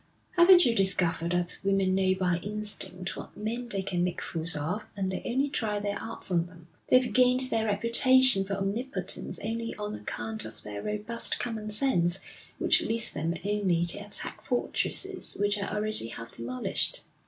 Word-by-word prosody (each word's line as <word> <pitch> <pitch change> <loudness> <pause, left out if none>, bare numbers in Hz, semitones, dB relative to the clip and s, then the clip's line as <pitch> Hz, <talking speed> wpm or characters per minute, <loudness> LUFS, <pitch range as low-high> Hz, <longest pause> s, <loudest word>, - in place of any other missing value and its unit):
Haven't 355 0 +6
you 240 - +2
discovered 185 -4 +2
that 175 0 -1
women 195 -1 +1
know 190 0 +2
by 180 -2 0
instinct 205 -3 -3
what - - -10
men 235 +3 -4
they 195 -4 -2
can 175 -2 -2
make 180 -1 -2
fools 165 -1 -3
of, 170 +9 -3
and 190 -1 -2
they - - -4
only 265 +4 0
try 220 -7 -2
their 205 0 -3
arts 225 -3 0
on 170 -1 +1
them? 170 -1 -17 0.2
They've 255 0 +3
gained 255 0 +4
their 225 -4 +1
reputation 235 +1 +6
for 195 +1 -4
omnipotence 195 -1 -3
only 230 +2 -4
on 210 0 -5
account 110 +1 -5
of 110 0 -10
their 105 -1 -6
robust 210 +2 -1
common 220 -3 -5
sense, 195 -7 +3 0.4
which - - +3
leads 225 0 -1
them 165 +2 -3
only 195 -5 0
to 175 +4 0
attack 205 0 -2
fortresses 370 +9 0
which 205 0 +1
are 200 - -3
already 210 - 0
half 115 0 -9
demolished.' 125 +2 0
205 Hz, 170 wpm, -28 LUFS, 175-230 Hz, 0.4 s, Haven't